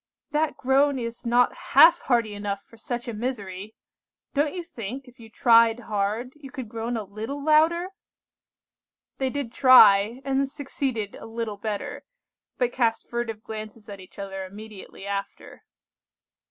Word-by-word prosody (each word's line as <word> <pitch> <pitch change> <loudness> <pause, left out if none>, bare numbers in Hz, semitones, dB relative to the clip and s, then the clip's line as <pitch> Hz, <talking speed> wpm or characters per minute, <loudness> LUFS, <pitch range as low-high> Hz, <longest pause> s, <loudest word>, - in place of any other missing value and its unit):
"That 305 +1 0
groan 275 +2 +3
is 235 0 -5
not 245 +1 +3 0.2
half 320 +5 +8
hearty 235 -4 +1
enough 205 -1 -4
for - - -19
such 240 +2 -5
a 235 - -4
misery. 210 -3 -5 0.6
Don't 290 +3 0
you 355 - -4
think, 255 -1 -7
if 250 0 -18
you 225 -1 -13
tried 230 +1 +4
hard, 215 +4 -2
you 280 -2 -11
could 255 -2 -7
groan 230 +1 -3
a 220 - -3
little 220 +8 -6
louder?" 325 +4 +4 1.3
They 265 -1 +1
did 260 -3 -4
try, 225 -3 +7
and 270 0 0
succeeded 270 -7 -3
a - - -10
little 225 -2 -4
better, 205 0 -5 0.5
but 245 -1 0
cast 230 -3 0
furtive 230 -2 -3
glances 215 0 -8
at 200 -1 -8
each 185 - -15
other 195 -1 -5
immediately 200 0 -10
after. 200 0 -6
230 Hz, 150 wpm, -25 LUFS, 210-265 Hz, 1.3 s, half